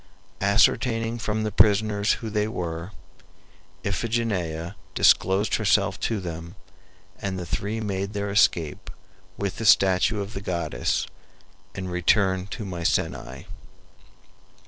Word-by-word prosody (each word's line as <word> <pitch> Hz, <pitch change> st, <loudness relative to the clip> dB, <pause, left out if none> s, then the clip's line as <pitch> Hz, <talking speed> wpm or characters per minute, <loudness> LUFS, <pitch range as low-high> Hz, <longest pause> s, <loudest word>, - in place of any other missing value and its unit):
Ascertaining 115 Hz, +3 st, +2 dB
from 110 Hz, -1 st, -1 dB
the 110 Hz, -, -1 dB
prisoners 105 Hz, 0 st, +3 dB
who 110 Hz, -2 st, -5 dB
they 105 Hz, 0 st, 0 dB
were, 85 Hz, -4 st, -4 dB, 1.0 s
Iphigenia 100 Hz, -6 st, -2 dB, 0.2 s
disclosed 95 Hz, +3 st, +3 dB
herself 100 Hz, -2 st, +2 dB
to 110 Hz, -2 st, -1 dB
them, 85 Hz, 0 st, -7 dB, 0.7 s
and 95 Hz, -1 st, -3 dB
the 90 Hz, -, -5 dB
three 105 Hz, +6 st, -3 dB
made 100 Hz, -1 st, -3 dB
their 100 Hz, -1 st, -2 dB
escape 85 Hz, -6 st, +2 dB, 0.5 s
with 100 Hz, -2 st, -3 dB
the -, -, -4 dB
statue 95 Hz, 0 st, +4 dB
of 100 Hz, +1 st, -5 dB
the 95 Hz, -, -5 dB
goddess, 85 Hz, -10 st, -1 dB, 0.7 s
and 95 Hz, -1 st, -5 dB
returned 95 Hz, +1 st, +2 dB
to 105 Hz, -, -5 dB
Mycenae. 85 Hz, -3 st, -2 dB
100 Hz, 115 wpm, -25 LUFS, 90-110 Hz, 1.0 s, statue